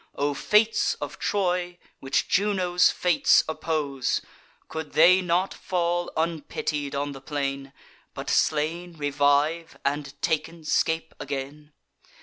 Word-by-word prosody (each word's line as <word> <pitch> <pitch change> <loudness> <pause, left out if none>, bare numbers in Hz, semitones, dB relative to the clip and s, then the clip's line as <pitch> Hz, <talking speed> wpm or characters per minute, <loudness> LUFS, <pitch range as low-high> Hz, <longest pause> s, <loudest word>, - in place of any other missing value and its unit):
O 145 +1 0
fates 215 +9 +2
of - - -7
Troy, 180 -3 -1 0.2
which 135 0 0
Juno's 185 -3 +3
fates 180 -3 +3
oppose! 150 -5 -1 0.5
Could 160 -2 -6
they 180 +4 +6
not 180 +1 0
fall 175 -1 -1
unpitied 150 -3 -2
on 145 +1 -2
the 135 -1 -9
plain, 140 -1 -3 0.4
But - - -6
slain 165 +3 0
revive, 145 +3 +1
and, 140 0 -2
taken, 160 +2 -2
scape 160 +1 0
again? 145 +2 -6
155 Hz, 115 wpm, -25 LUFS, 145-175 Hz, 0.5 s, they